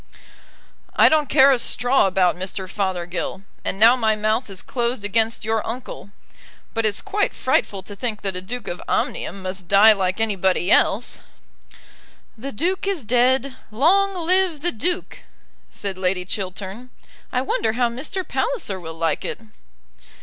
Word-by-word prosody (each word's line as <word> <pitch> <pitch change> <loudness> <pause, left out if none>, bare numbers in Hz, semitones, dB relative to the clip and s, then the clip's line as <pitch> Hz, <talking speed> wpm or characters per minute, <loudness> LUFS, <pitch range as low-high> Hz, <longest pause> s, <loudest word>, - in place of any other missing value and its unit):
"I - - +7
don't 310 -2 +2
care 275 -1 +6
a 260 - +2
straw 245 -1 +2
about 185 -2 +2
Mr. 185 +1 -4
Fothergill; 185 -1 -3 0.2
and - - -2
now 230 +4 +7
my 220 -3 +1
mouth 215 +2 0
is 190 -2 -7
closed 240 -3 -2
against 220 +1 +1
your 220 -1 0
uncle. 240 -3 -7 0.6
But 225 -1 +1
it's 205 - -2
quite 410 0 -1
frightful 200 -6 0
to 205 +2 -10
think 215 0 -4
that 195 -2 -1
a 180 - 0
Duke 245 +6 -6
of 175 - -5
Omnium 195 - -2
must 185 -1 -5
die 205 +3 +7
like 190 0 -1
anybody 190 -4 +1
else." 225 +5 +2 1.2
"The 265 +5 -7
Duke 370 - -1
is 380 -8 -1
dead; 255 +3 +2
long 355 - +2
live 365 -4 +2
the 350 - 0
Duke," 350 - -2 0.5
said 195 -2 -6
Lady 180 -1 0
Chiltern. 195 +5 -5 0.4
"I 250 - 0
wonder 225 -4 0
how 245 +1 +2
Mr. 305 +11 -4
Palliser 410 - -2
will 160 -2 -8
like 165 0 -1
it." - - -4
220 Hz, 155 wpm, -22 LUFS, 195-265 Hz, 1.2 s, I